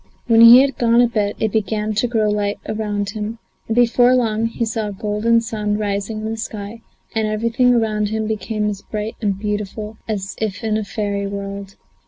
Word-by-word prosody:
When 230 -2 +5
he 235 +2 +10
had 275 -2 -1
gone 235 0 +4
a 245 - +5
bit 210 -3 -1
it 220 - 0
began 215 0 -1
to 215 +4 +1
grow 225 -3 +1
light 205 -1 0
around 205 -2 -2
him, 215 +2 -5 0.3
and 225 - -1
before 245 +1 +4
long 225 -2 +1
he 230 0 -2
saw 220 -1 -2
a - - -4
golden 210 +3 +1
sun 210 -2 -2
rising 205 +1 -2
in 220 +1 -3
the 225 - -4
sky 220 0 -6 0.3
and 220 -1 0
everything 230 +4 +2
around 215 -2 0
him 220 0 -2
became 215 0 -2
as 205 -2 -3
bright 215 +1 -5
and 200 -3 0
beautiful 210 +1 -4
as 200 -3 -3
if 215 -1 -3
in 220 -1 0
a 215 - -1
fairy 200 -1 -3
world. 200 0 -6
215 Hz, 200 wpm, -20 LUFS, 205-225 Hz, 0.3 s, he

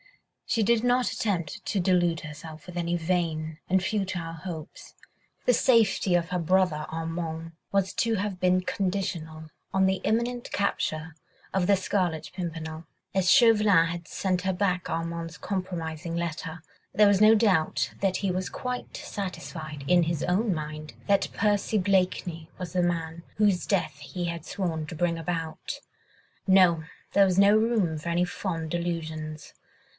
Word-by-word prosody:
She 225 - +2
did 230 +2 +3
not 245 0 +2
attempt 180 -8 -2
to 200 - 0
delude 175 -2 +2
herself 155 0 -9
with 180 -1 -10
any 175 0 0
vain 160 -2 -1
and 190 +1 +3
futile 185 -4 -2
hopes; 165 -2 -8 0.5
the 250 - +5
safety 225 -6 +3
of 170 -1 +1
her 180 0 -1
brother 170 -3 +2
Armand 165 0 -4 0.2
was 195 -1 +1
to 230 -1 +1
have 200 -2 -2
been 185 0 +3
conditional 180 -5 -3 0.2
on 190 0 +4
the 190 0 +1
imminent 240 +2 0
capture 160 -5 -1 0.4
of 190 -2 +1
the 200 - +5
Scarlet 180 -4 -1
Pimpernel. 165 -2 -5 0.3
As 185 -2 +3
Chauvelin 210 -8 +6
had 170 0 -5
sent 185 -2 0
her 190 0 0
back 180 -1 0
Armand's 165 0 -3
compromising 170 -3 -4
letter, 165 -1 -4 0.3
there 210 -1 +6
was 200 0 +4
no 215 +1 +8
doubt 200 -8 +2
that 190 -2 +2
he 195 -2 0
was 185 +1 -2
quite 250 0 -5
satisfied 160 -7 -6
in 175 +1 +5
his 165 -2 -1
own 195 +3 +1
mind 155 -1 -6
that 200 -1 +2
Percy 210 +1 +1
Blakeney 180 -4 0
was 180 -3 -6
the 180 -1 +2
man 165 -1 -2 0.2
whose 205 -4 +3
death 160 -8 0
he 175 +5 -5
had 170 -1 -4
sworn 165 -5 -2
to 170 - -7
bring 170 +1 0
about. 165 -1 -4 0.7
No! 180 -4 +5 0.3
there 200 - +6
was 185 -1 +1
no 200 +1 +7
room 215 -8 +2
for 170 - -5
any 175 +1 +2
fond 165 -4 -4
delusions! 160 -3 -4
180 Hz, 155 wpm, -27 LUFS, 165-195 Hz, 0.7 s, no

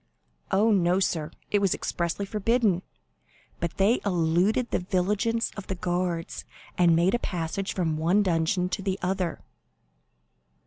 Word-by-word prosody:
"Oh, 215 +4 +3
no, 180 -2 +3
sir, 160 -5 -1 0.2
it 205 - +3
was 195 -2 +2
expressly 170 +3 -2
forbidden; 210 -2 +1 0.8
but 170 - -3
they 205 +5 +3
eluded 180 +6 +1
the - - +1
vigilance 205 +6 0
of 205 - -8
the 190 - -3
guards, 175 -1 -2 0.3
and 175 -2 +4
made 175 +5 +3
a 240 - +2
passage 180 +1 -3
from 160 -4 0
one 175 +6 +3
dungeon 180 0 +1
to 190 - -3
the 190 -1 -1
other." 180 -2 -1
185 Hz, 140 wpm, -26 LUFS, 170-200 Hz, 0.8 s, and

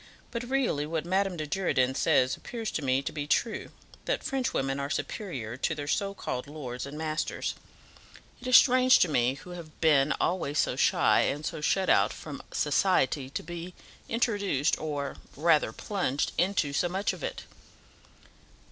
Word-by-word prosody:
But 235 - -3
really 250 - 0
what 160 0 -2
Madame 190 0 0
de 155 - -3
Girardin 145 -6 +1
says 130 -3 +2
appears 230 -3 -5
to - - -2
me 135 0 +1
to - - -3
be 145 -1 -4
true, 220 +8 0 0.4
that - - -1
French 265 -1 -1
women 135 +1 -1
are 140 0 -3
superior 130 - -4
to 160 +4 -1
their 145 -1 -5
so 200 +5 -1
called 125 -6 -4
lords 135 -4 -6
and 145 +2 -8
masters. 155 0 -2 0.9
It - - -7
is 255 - +9
strange 255 -1 +6
to - - +4
me, 125 -4 +2
who 180 +6 -11
have 170 -3 -10
been 150 -3 +4
always 165 -5 0
so - - +2
shy, - - +4
and 150 +2 -1
so 165 -2 -4
shut 190 +4 +1
out - - +4
from 145 -3 -8
society, 145 -4 +1
to - - -4
be 175 +2 -7 0.3
introduced 205 - +1
or 145 -2 -3 0.2
rather 155 -6 +3
plunged 145 - -1
into 175 -5 +1
so 175 +5 +1
much 190 +3 -1
of - - -9
it." - - -4
155 Hz, 170 wpm, -28 LUFS, 140-195 Hz, 0.9 s, is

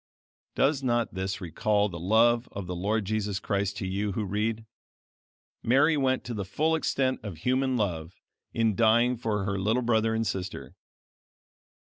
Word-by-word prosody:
Does 140 0 +2
not 120 -2 0
this 95 +1 -3
recall 105 +3 0
the 85 -4 -7
love 115 +6 +3
of 100 -1 -5
the 90 0 -4
Lord 105 +4 -1
Jesus 105 -1 -1
Christ 100 -1 -2
to 95 - -3
you 100 +2 -2
who 105 +2 -2
read? 110 +3 -2 1.0
Mary 140 +7 +4
went 130 -2 +1
to 120 -1 -5
the 105 -3 -3
full 155 +12 0
extent 135 -4 0
of 100 -7 -7
human 130 - +1
love 85 -6 -2 0.4
in 115 -2 +1
dying 120 +3 +4
for 110 -4 -2
her 100 0 -2
little 110 +6 +1
brother 110 -1 +2
and 115 0 0
sister. 95 -3 -4
110 Hz, 160 wpm, -27 LUFS, 100-120 Hz, 1.0 s, Mary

